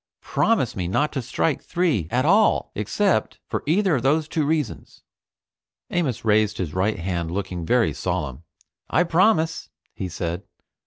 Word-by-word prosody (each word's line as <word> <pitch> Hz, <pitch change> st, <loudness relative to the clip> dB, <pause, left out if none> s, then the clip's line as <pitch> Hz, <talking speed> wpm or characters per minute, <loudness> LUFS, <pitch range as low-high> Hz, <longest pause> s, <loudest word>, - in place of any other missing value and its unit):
Promise 215 Hz, -, +1 dB
me 90 Hz, -2 st, -2 dB
not 145 Hz, +11 st, +1 dB
to 135 Hz, -, -1 dB
strike 130 Hz, +4 st, -1 dB
three 155 Hz, -, 0 dB
at 125 Hz, +5 st, +1 dB
all 205 Hz, +6 st, +3 dB
except 180 Hz, -, 0 dB
for -, -, -3 dB
either 180 Hz, -1 st, +3 dB
of -, -, -3 dB
those 150 Hz, +4 st, +2 dB
two 155 Hz, -2 st, -1 dB
reasons." 150 Hz, -7 st, -3 dB, 0.9 s
Amos 140 Hz, -11 st, -1 dB
raised 105 Hz, -1 st, +3 dB
his 85 Hz, -5 st, -3 dB
right 100 Hz, +4 st, 0 dB
hand 85 Hz, -2 st, -2 dB
looking 90 Hz, -2 st, -4 dB
very -, -, +3 dB
solemn. 65 Hz, +2 st, -3 dB, 0.5 s
"I 160 Hz, +7 st, +3 dB
promise," 165 Hz, -2 st, +2 dB, 0.2 s
he 95 Hz, -, -5 dB
said. 85 Hz, +1 st, -3 dB
130 Hz, 150 wpm, -23 LUFS, -, 0.9 s, all